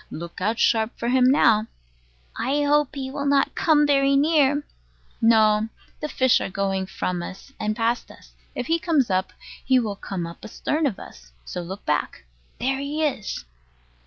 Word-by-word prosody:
Look 170 +2 -8
out 220 +4 0
sharp 225 -1 +2
for 235 - -2
him 255 0 +4
now. 225 -5 +4 0.7
I 285 +4 0
hope 295 0 +2
he 265 -1 -4
will 280 +1 -3
not 280 -1 +2
come 300 -2 +3
very 275 -1 +3
near. 290 -1 +3 0.6
No. 220 -1 +4 0.3
The 300 - -4
fish 260 -3 +3
are - - -3
going 195 0 -1
from 180 -1 -3
us 195 +10 -9
and 215 0 -1
past 230 +2 -1
us. - - -16 0.2
If 250 - -3
he 330 +5 +1
comes 300 - +1
up, 185 0 0 0.3
he 260 0 +3
will 220 -5 -1
come 190 -3 -5
up 170 0 -10
astern 300 +7 -1
of 220 - -3
us, 60 0 -13
so 180 - -5
look 190 +4 -8
back. 150 - -2 0.3
There 265 +2 0
he 290 +3 -2
is! 215 - -3
240 Hz, 175 wpm, -24 LUFS, 200-280 Hz, 0.7 s, him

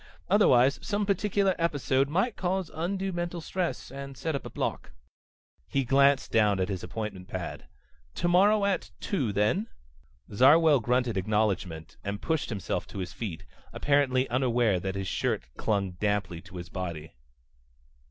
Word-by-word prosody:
Otherwise 140 - +5
some 205 0 -1
particular 200 0 +1
episode 140 -4 +1
might 190 +9 +1
cause 185 -1 -2
undue 190 +4 -2
mental 175 0 -3
stress, 165 -6 -3
and 140 0 -8
set 160 +3 -2
up 140 - -4
a - - -8
block." - - -4 0.7
He 135 - 0
glanced 140 +2 +3
down 105 -3 +3
at 95 - 0
his 95 -3 -3
appointment 105 -5 -5
pad. 90 -3 -6 0.5
"Tomorrow 200 +4 +4
at 200 -2 0
two, 135 - -1
then?" 105 - +1 0.7
Zarwell 145 +6 +6
grunted 125 -1 0
acknowledgment 95 -5 -1
and 100 0 -3
pushed 160 -3 -1
himself 100 -6 -3
to - - -10
his 90 -2 -4
feet, 95 -5 -6 0.3
apparently 135 -2 +2
unaware 120 -6 +2
that 95 +2 -4
his 95 -1 -3
shirt - - -1
clung 100 -3 0
damply 90 -2 -2
to - - -13
his 85 0 -7
body. 85 -4 -5
130 Hz, 145 wpm, -28 LUFS, -, 0.7 s, Zarwell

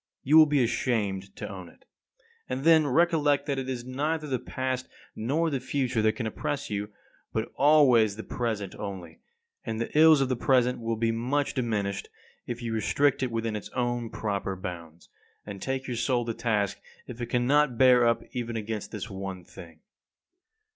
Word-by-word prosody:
You 145 +4 +3
will 160 -1 +9
be 145 -3 +3
ashamed 100 -5 -1
to - - -6
own 95 -3 -8
it. - - -23 0.6
And 130 +1 -3
then 160 -2 +5
recollect 145 -1 +2
that 140 -2 -1
it 130 0 -4
is 120 -2 -4
neither 150 +5 -2
the 130 -4 -2
past 130 +1 -3 0.3
nor 155 +9 0
the 135 - -1
future 130 -3 -1
that 110 0 +3
can 115 +1 -4
oppress 140 +5 -3
you, 105 0 -3 0.4
but 110 0 -3
always 130 -8 +5
the 110 - -7
present 110 -6 -3
only. 95 -5 -7 0.4
And 110 -1 -4
the 115 - -4
ills 155 -1 +7
of 135 - +2
the 130 - 0
present 125 0 +2
will 115 0 -2
be 115 +1 +1
much 130 +5 -1
diminished 105 -6 -2 0.4
if 120 0 -5
you 115 -1 -3
restrict 140 +6 +1
it 130 - 0
within 115 -1 -2
its 105 - -6
own 120 -2 -1
proper 100 -3 -3
bounds, 85 -3 -8 0.4
and 100 -2 -8
take 135 0 -2
your 125 - -3
soul 120 -1 +1
to 115 - -2
task 110 -4 -1 0.3
if 120 0 -9
it 120 - -2
cannot 125 +2 +2
bear 125 -2 +6
up 115 - +1
even 120 -2 -4
against 110 -1 -4
this - - -5
one 95 -3 -6
thing. 80 -1 -13
120 Hz, 180 wpm, -27 LUFS, 110-135 Hz, 0.6 s, will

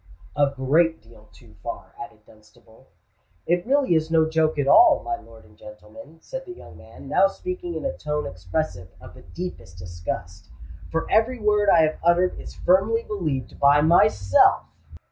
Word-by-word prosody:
"A 145 -1 +2
great 160 +5 +1
deal 110 -1 -20
too - - -19
far," - - -8
added 110 -6 -12
Dunstable. 110 +1 -22 0.6
"It 175 +4 -1
really 275 -7 +2
is 160 -1 0
no 160 -1 +3
joke 160 -1 0
at 140 -1 -1
all, 335 - +6
my 360 - -3
lord 115 - -17
and 105 - -22
gentlemen," 105 - -14
said - - -8
the 360 - -9
young - - -14
man, - - -14
now 195 - +3
speaking 360 - -6
in - - -5
a 270 - -2
tone 150 -1 -4
expressive 95 - -4
of - - -14
the - - -15
deepest 95 - -9
disgust: 90 +1 -7 0.4
"for 165 0 -2
every 235 +3 +2
word 210 -1 +2
I 165 -3 +5
have 155 0 -1
uttered 175 +2 +2
is - - -11
firmly 205 +6 +1
believed 160 - -4
by 145 +1 +5
myself!" 100 - +3
160 Hz, 170 wpm, -23 LUFS, -, 0.6 s, all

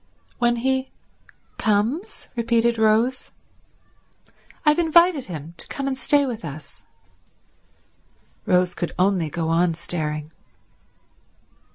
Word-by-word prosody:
"When 240 -1 +3
he 265 +2 -1 0.7
comes?" 220 - -1
repeated 235 0 +1
Rose. 225 +4 +2 1.4
"I've 300 +2 +4
invited 340 -3 +4
him 160 -2 -8
to - - -4
come 275 -1 -4
and 270 - -1
stay 285 +2 +2
with 235 -4 -5
us." 150 -1 -9 1.6
Rose 180 -1 +3
could 175 -1 -4
only 185 -4 +2
go 165 +1 -3
on 170 0 +2
staring. 155 -2 -3
220 Hz, 100 wpm, -23 LUFS, 170-265 Hz, 1.6 s, I've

